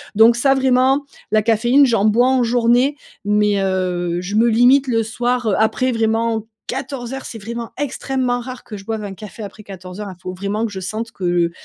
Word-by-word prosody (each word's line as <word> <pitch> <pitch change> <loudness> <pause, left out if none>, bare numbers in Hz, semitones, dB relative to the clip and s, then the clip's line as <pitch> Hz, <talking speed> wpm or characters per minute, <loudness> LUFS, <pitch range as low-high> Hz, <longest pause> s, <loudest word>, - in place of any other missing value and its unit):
donc 225 +2 +6
ça, 270 +3 +3
vraiment, 265 +1 +2 0.3
la 215 - +4
caféine, 240 +5 +4
j'en 230 -6 +1
bois 225 +4 +4
en 260 -1 +3
journée, 245 +4 +2 0.3
mais, 210 0 +2
heu, 180 -2 -1
je 180 +3 -4
me 225 +2 +4
limite 250 +4 +4
le 225 -2 +1
soir, 240 +2 -1
heu, 210 - +2
après 235 +4 +1
vraiment 225 0 0 0.2
14:00, 265 0 -5
c'est 230 - -7
vraiment 230 +2 -6
extrêmement 260 -3 -1
rare 250 0 -8
que 215 - -9
je 195 -1 -10
boive 220 -1 -3
un 200 -1 -6
café 210 +3 -9
après 205 +1 -9
14:00, 190 0 -8
hein, 190 - -8
il - - -30
faut 185 - -5
vraiment 200 +4 -2
que 225 - -5
je 190 - -6
sente 220 +5 -5
que 175 -2 0
225 Hz, 200 wpm, -19 LUFS, 200-245 Hz, 0.3 s, donc